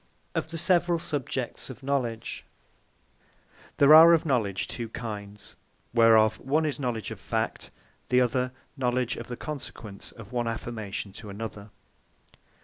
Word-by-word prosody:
OF - - -2
THE 165 +1 -5
SEVERALL 175 0 +5
SUBJECTS 135 -6 -2
OF 130 +1 -10
KNOWLEDGE 130 -5 -2 1.3
There 145 +1 +7
are 165 +2 +10
of 165 - +2
KNOWLEDGE 110 - 0
two 115 -2 -5
kinds; 105 -3 -7 0.4
whereof 110 -2 +5
one 150 +4 0
is 150 -2 -2
Knowledge 120 -6 -3
Of - - -7
Fact: - - -3 0.4
the 125 - +4
other 125 +1 +1 0.2
Knowledge 125 -2 0
Of - - -7
The 120 - -6
Consequence 120 -8 -7
Of 115 -1 -13
One 120 -1 -1
Affirmation 110 -3 -5
To 105 - -10
Another. 105 0 -7
120 Hz, 140 wpm, -27 LUFS, 110-140 Hz, 1.3 s, are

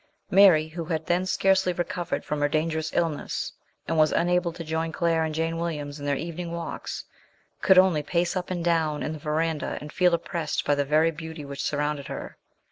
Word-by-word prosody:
Mary, 180 -5 +7
who 165 +1 -5
had 160 -1 -2
then 180 +2 +1
scarcely 190 -1 +3
recovered 175 0 -3
from 150 -1 -2
her 145 - +3
dangerous 155 +1 -1
illness, 165 -4 -2 0.3
and 160 - +1
was 155 0 +5
unable 175 0 +2
to 165 0 -7
join 160 +1 -2
Claire 165 -1 +1
and 155 -1 -2
Jane 165 +1 -1
Williams 150 -3 -4
in 145 - -5
their 140 - +2
evening 170 +3 -5
walks, 170 0 -5 0.6
could 190 -2 +5
only 185 -5 +5
pace 170 +4 0
up 185 -1 -3
and 175 -2 -3
down 160 -3 +1
in 155 - -2
the 155 - -7
verandah 155 +1 -1
and 150 0 -9
feel 180 -2 +4
oppressed 165 -2 -3
by 145 - +3
the 145 0 +1
very 155 +3 +3
beauty 160 -1 -8
which 140 -1 -6
surrounded 145 -1 -1
her. - - -6
160 Hz, 200 wpm, -26 LUFS, 150-175 Hz, 0.6 s, Mary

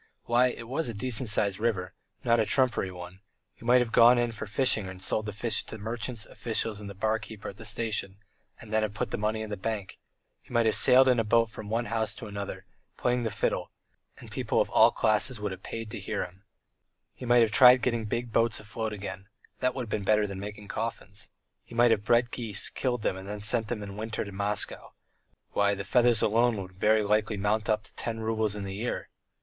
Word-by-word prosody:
Why, 120 +2 +3
it 115 -2 -6
was 135 +2 -1
a 115 - -5
decent 120 +2 0
sized 100 -2 +1
river, 105 -5 -1 0.3
not 115 -1 +3
a 110 - +3
trumpery 125 -5 +1
one; 90 +1 -10 0.3
he - - -18
might 125 +1 +5
have 120 -2 -2
gone 120 +2 +7
in 120 -1 +1
for 110 -1 -7
fishing 110 -2 +2
and 95 0 -9
sold 110 +3 -1
the - - -3
fish 110 +3 +1
to 110 - -7
merchants, 115 +1 -3
officials, 110 -2 -2
and 105 -1 -8
the 100 - -9
bar 110 +3 0
keeper 110 -2 -8
at 100 - -11
the 115 - -9
station, 105 -3 -2 0.4
and 110 -1 -10
then 110 - +3
have 105 -1 -2
put - - -2
money 110 +1 -1
in 110 - -7
the 105 - -3
bank; 105 -1 -4 0.4
he - - -21
might 120 -1 +2
have 110 - +3
sailed 130 +1 +6
in 125 -2 +4
a - - +2
boat 115 +1 +2
from 105 -1 -8
one 115 +2 0
house 110 -2 -2
to 120 - -8
another, 100 -1 -6 0.3
playing 125 0 +1
the 115 - -1
fiddle, - - -2 0.5
and - - -13
people - - -1
of - - +1
all - - +7
classes 110 +3 +2
would 105 -1 -3
have 95 0 -8
paid 115 +1 -6
to - - -5
hear 95 - -3
him; 95 +3 -16 0.7
he - - -12
might 120 0 +6
have 110 - +1
tried 125 +2 +7
getting 115 -3 0
big 120 +2 -3
boats 115 -1 +2
afloat 110 +1 -4
again 100 -1 -7 0.3
that 130 0 0
would 125 -3 -4
be 105 - -2
better 105 +1 +2
than 100 -2 -6
making 105 +1 -8
coffins; 110 -2 -5 0.3
he 120 - -13
might 120 0 +5
have 105 -2 +2
bred 120 +2 +3
geese, 110 -5 -2
killed 125 -4 -2
them - - 0
and 100 +2 -5
sent 115 0 +2
them 110 -2 -4
in 100 - -7
the 100 - -9
winter 110 +1 -4
to 100 - -8
Moscow 100 +1 -2 0.6
Why, 100 0 +2
the 100 - -5
feathers 120 +2 +3
alone 115 +1 +3
would 95 -1 -7
very 105 +4 +2
likely 105 +1 +1
mount 105 +2 0
up 110 0 +1
to - - -16
ten 115 -1 -4
roubles 110 -2 -1
in 105 - -5
the 95 0 -5
year. 115 +5 -3
110 Hz, 230 wpm, -28 LUFS, 105-120 Hz, 0.7 s, gone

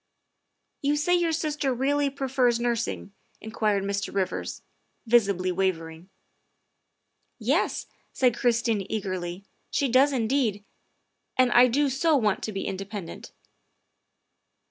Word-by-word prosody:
" - - -52
You 285 +1 +1
say 305 +4 +1
your 345 -2 +2
sister 305 -3 -1
really 280 +3 +1
prefers 260 -3 +1
nursing?" 235 -4 -2 0.3
in 220 - -9
quired 210 -3 +1
Mr. 200 +1 -2
Rivers, 195 -2 -3 0.4
visibly 200 -6 +2
wavering. 170 -2 -2 0.5
' - - -51
' - - -49 0.2
Yes, - - 0
' - - -38
' - - -43
said 250 -3 +2
Christine 235 -4 +1
eagerly, 185 -3 -4
' - - -44
' - - -44
she 280 - +1
does 265 +4 +5
indeed, 230 -4 0 0.7
and 255 -1 +4
I 245 +1 +7
do 285 +4 +2
so 290 +4 +2
want 215 -6 +1
to 220 - -4
be 195 -1 -4
independent. 195 -1 -6
235 Hz, 145 wpm, -26 LUFS, 195-270 Hz, 0.7 s, I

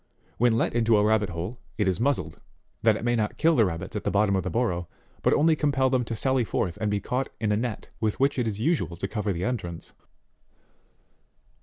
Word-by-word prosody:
When 120 0 +4
let - - +1
into 115 -2 +3
a 105 - +3
rabbit 105 -1 +2
hole, 90 +8 -5 0.2
it 105 - +1
is 95 0 0
muzzled, 140 +4 -1 0.4
that 110 -1 +4
it 110 - -5
may 120 0 +2
not 110 -2 -1
kill 165 0 +4
the 115 - +5
rabbits 85 +3 -5
at 105 - -3
the - - 0
bottom 100 0 +2
of 95 - +1
the - - -3
burrow, 90 -8 -1 0.3
but - - +3
only 160 +1 +4
compel 135 -3 +1
them 130 -2 +2
to 115 - -4
sally 130 +2 +1
forth 90 -5 -1
and 105 - +1
be 105 0 0
caught 125 +6 -2
in 110 -1 0
a - - +3
net 115 -1 -3
with 110 -2 -1
which 135 0 +2
it 120 - 0
is 105 -2 -3
usual 110 - 0
to 95 - -3
cover 105 0 -2
the 85 -1 -2
entrance. 100 -9 -4
110 Hz, 225 wpm, -26 LUFS, 100-125 Hz, 0.4 s, the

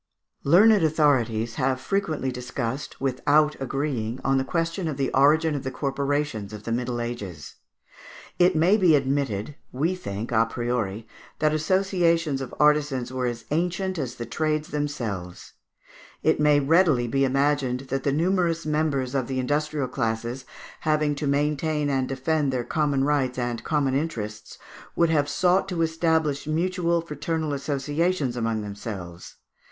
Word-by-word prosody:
Learned 200 +7 +6
authorities 120 -8 +2
have 130 0 +1
frequently 155 -6 -1
discussed, 125 +2 -4
without 145 +3 +2
agreeing, 130 -4 -2
on 135 0 +2
the - - 0
question 165 +4 -2
of 150 -4 -3
the 135 -1 -1
origin 155 +4 +4
of 145 - -2
the 130 - -3
Corporations 140 -5 -2
of 105 -1 -8
the 115 - -4
Middle 120 0 -1
Ages. 105 -10 -6 0.8
It 180 0 +5
may 175 +7 +4
be 180 -7 +5
admitted, 135 -3 -1
we 155 +8 0
think 105 - -5
à 115 -1 +3
priori, 115 -3 -2 0.3
that 155 0 +2
associations 170 -3 +1
of 130 - -6
artisans 150 -4 +2
were 130 -1 -1
as 120 -1 -5
ancient 180 +3 -1
as 130 -3 -3
the 120 - -5
trades 155 +5 -1
themselves. 115 -12 -4 0.7
It - - +3
may 150 -1 +5
readily 145 -4 +3
be 135 +3 +1
imagined 135 -1 +1
that 135 - -1
the 140 - 0
numerous 170 +1 +1
members 150 -4 0
of 130 -3 0
the 130 - -3
industrial 145 +1 -1
classes, 120 +1 -3 0.3
having 155 -1 +1
to 145 0 -3
maintain 150 +1 0
and 130 -1 0
defend 140 +2 0
their 125 -2 -1
common 145 -1 0
rights 135 -3 +1
and 120 -2 -2
common 145 -4 0
interests, 110 -8 -4 0.4
would 170 -1 +3
have 145 -2 +2
sought 180 +5 +2
to 170 -3 0
establish 160 -3 0
mutual 170 +1 0
fraternal 155 0 -3
associations 145 +1 -1
among 115 -2 -1
themselves. 100 -4 -7
140 Hz, 145 wpm, -25 LUFS, 125-155 Hz, 0.8 s, Learned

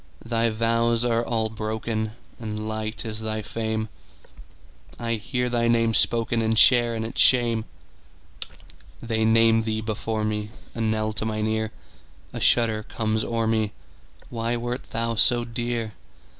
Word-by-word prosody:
Thy 115 0 +1
vows 115 +1 +1
are 115 -1 +2
all 115 -2 0
broken, 110 0 -3 0.3
And 110 -1 -4
light 110 +1 -3
is 110 -1 -3
thy 110 -1 -3
fame:I 110 - -7
hear 125 +3 -2
thy 120 -1 +1
name 115 -1 +3
spokenAnd 115 -1 +1
share 120 -1 +6
in 110 0 -3
its 115 - 0
shame. 120 -3 +4 1.3
They 110 -2 0
name 115 0 +5
thee 110 -1 -2
before 110 0 -2
me,A 105 +2 -5
knell 110 -1 0
to 110 - -1
mine 110 -1 -1
ear;A 110 0 -6
shudder 115 -2 +3
comes 110 0 -1
o'er 115 -1 -1
me—Why 115 +1 -3
wert 120 +2 -4
thou 115 0 -1
so 120 +2 +4
dear? 120 -2 -3
115 Hz, 130 wpm, -25 LUFS, 110-115 Hz, 1.3 s, share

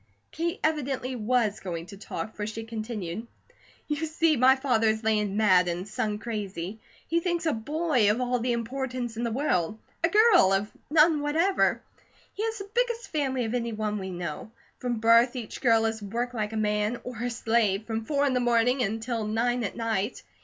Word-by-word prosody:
Kate 340 +3 -2
evidently 270 -4 -1
was 225 -2 +1
going 170 -3 -5
to 200 - -11
talk, 215 +2 -6
for 210 0 -3
she 220 +1 -5
continued: 220 -3 -5 0.6
"You 300 +2 -1
see 315 0 +2
my 260 +1 +6
father 250 -5 +1
is 220 +1 +1
land 210 -2 +1
mad, 185 -4 +5
and 175 +3 -3
son 210 0 -2
crazy. 210 -3 -5 0.3
He 335 +2 +2
thinks 345 -1 -1
a 315 - +2
BOY 285 -1 +1
of 215 +3 +2
all 250 0 0
the 245 +1 0
importance 245 0 -3
in 230 - -4
the 235 - -1
world; 215 - 0 0.3
a 335 - +4
GIRL 415 - +6
of 200 +2 0 0.2
none 305 0 +5
whatever. 325 +7 +2 0.5
He 420 - -4
has 450 0 -1
the 395 0 -8
biggest 480 -1 0
family 265 -5 0
of 220 - -3
any 235 -2 -1
one 210 -1 -2
we 190 -1 -5
know. 175 +1 -5 0.3
From 245 -2 -2
birth 230 +3 +5
each 235 -4 -6
girl 225 -3 +4
is 220 -1 -2
worked 235 +5 -3
like 215 -2 -2
a - - -2
man, 210 +2 0
or 245 -3 -7
a 245 - -1
slave, 225 -3 +1
from 225 0 -3
four 285 +4 +1
in 275 - +1
the 250 - +2
morning 245 +1 +2
until 225 +1 -1
nine 240 +3 0
at 200 - -4
night. 225 -1 -2
230 Hz, 195 wpm, -27 LUFS, 215-270 Hz, 0.6 s, my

